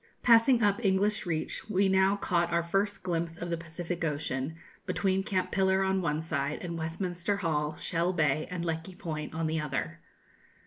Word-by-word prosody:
Passing 235 +1 +6
up 205 +3 +2
English 195 0 +2
Reach, 160 +5 -2
we 195 -1 +3
now 190 +1 +4
caught 175 -3 0
our 170 0 +2
first 195 +4 -1
glimpse 170 -2 -2
of 170 0 -5
the - - +2
Pacific 170 +1 -5
Ocean, 145 -1 -2 0.3
between 190 -1 +1
Cape 190 -1 -1
Pillar 190 0 +3
on 190 0 +1
one 155 -2 0
side, 145 -2 -1
and 170 -1 -4
Westminster 175 +4 -2
Hall, 155 -5 -1
Shell 175 +1 0
Bay, 155 -2 +1
and 175 -1 -3
Lecky 165 +2 -3
Point, 155 -3 -5
on 165 0 -1
the 160 0 0
other. 135 - -3
170 Hz, 175 wpm, -30 LUFS, 160-190 Hz, 0.3 s, Passing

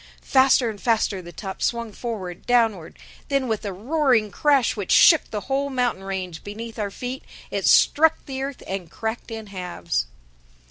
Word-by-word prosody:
Faster 260 -2 +4
and 215 -3 -5
faster 220 -4 +1
the 175 -1 -11
top 190 +3 -7
swung 235 -2 -1
forward, 200 -6 -6
downward. 225 -9 +1 0.3
Then, 275 -2 0
with 220 -2 -2
a 200 - -2
roaring 240 - +1
crash 280 -2 +2
which 200 -4 -4
shook 320 -3 +6
the 210 - -4
whole 275 +3 -1
mountain 245 -7 -1
range 185 -4 -5
beneath 225 +3 -7
our 205 -1 -1
feet, 250 +6 -6 0.3
it - - -1
struck 320 +2 +5
the 265 -1 -5
earth 275 0 -5
and 190 -3 -5
cracked 220 +7 -5
in 225 -1 -6
halves. 180 - -3
225 Hz, 170 wpm, -23 LUFS, 195-260 Hz, 0.3 s, shook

